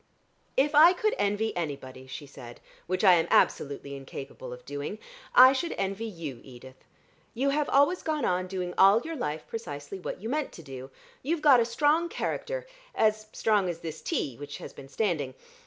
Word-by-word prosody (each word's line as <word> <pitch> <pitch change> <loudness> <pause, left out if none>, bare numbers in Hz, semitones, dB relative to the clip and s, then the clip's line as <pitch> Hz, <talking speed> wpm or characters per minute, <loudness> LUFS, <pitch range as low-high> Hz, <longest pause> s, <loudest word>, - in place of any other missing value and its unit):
"If 285 +3 +3
I 320 +5 +8
could 430 +4 0
envy 205 +2 0
anybody," 135 -6 -5
she 145 +3 -8
said, 125 -4 -12 0.3
"which 185 +2 -1
I 190 -3 +8
am 165 -2 +3
absolutely 140 0 +1
incapable 135 -1 -8
of 125 0 -10
doing, 145 +8 -5 0.4
I 255 +1 +9
should 335 +6 -2
envy 195 +3 -2
you, 165 - -7
Edith. 130 0 -14 0.5
You 270 +4 +1
have 295 +1 0
always 285 +6 +3
gone 305 -4 -1
on 180 0 0
doing 180 -1 -4
all 195 +4 +7
your 325 0 -5
life 155 - -3
precisely 150 -5 -7
what 180 - -5
you 215 - -6
meant 295 +3 -2
to 170 - -11
do. 135 -2 -9 0.3
You've 305 +3 -2
got 280 -5 +7
a 235 - +3
strong 300 +8 +2
character, - - -3 0.3
as 215 0 +1
strong 205 -4 +1
as 170 -1 -5
this 160 -2 -6
tea, 130 -5 -2
which 145 0 -7
has - - -9
been 135 - -12
standing. 145 -6 -1
190 Hz, 185 wpm, -28 LUFS, -, 0.5 s, I